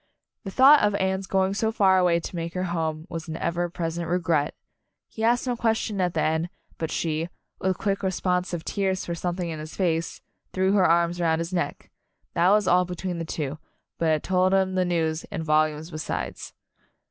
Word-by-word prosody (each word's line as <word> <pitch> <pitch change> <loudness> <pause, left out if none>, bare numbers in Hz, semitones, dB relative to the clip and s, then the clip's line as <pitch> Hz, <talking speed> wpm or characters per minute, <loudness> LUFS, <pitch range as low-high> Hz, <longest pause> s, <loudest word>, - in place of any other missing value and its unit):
The - - -3
thought 270 +8 +7
of 205 -1 +2
Anne's 190 0 -1
going 190 0 +1
so 220 +2 0
far 190 -4 +4
away 175 -2 +3
to 170 - -7
make 170 +1 -4
her 180 - -1
home 160 -1 -2
was 165 -2 -6
an 160 0 -4
ever 175 +1 -1
present 170 0 -3
regret. 170 -4 +1 0.5
He 220 - -6
asked 240 +2 +3
no 250 -1 0
question 220 -3 0
at 180 -1 0
the - - +1
end, 160 +2 0 0.3
but 160 - -2
she 165 +1 -1 0.3
with 190 -1 0
quick 200 -1 -1
responsive 180 -2 -1
tears 190 -2 -1
for 170 - -3
something 175 0 -3
in 155 - -5
his 155 +1 -8
face 165 -3 -1 0.3
threw 190 0 +2
her 195 -2 +4
arms 170 +1 +3
about 165 -2 +2
his 165 +2 -4
neck. 175 -5 -3 0.4
That 175 +2 +3
was 205 -1 +4
all 180 +1 +5
between 180 0 -4
the 165 - -3
two, 150 -2 -4 0.4
but 165 - +1
it - - +4
had 155 - -1
told 185 0 +2
the 190 -1 +2
news, 165 -2 0
and 160 - -5
volumes 155 +1 +1
besides. 155 -1 -4
175 Hz, 195 wpm, -25 LUFS, 165-190 Hz, 0.5 s, thought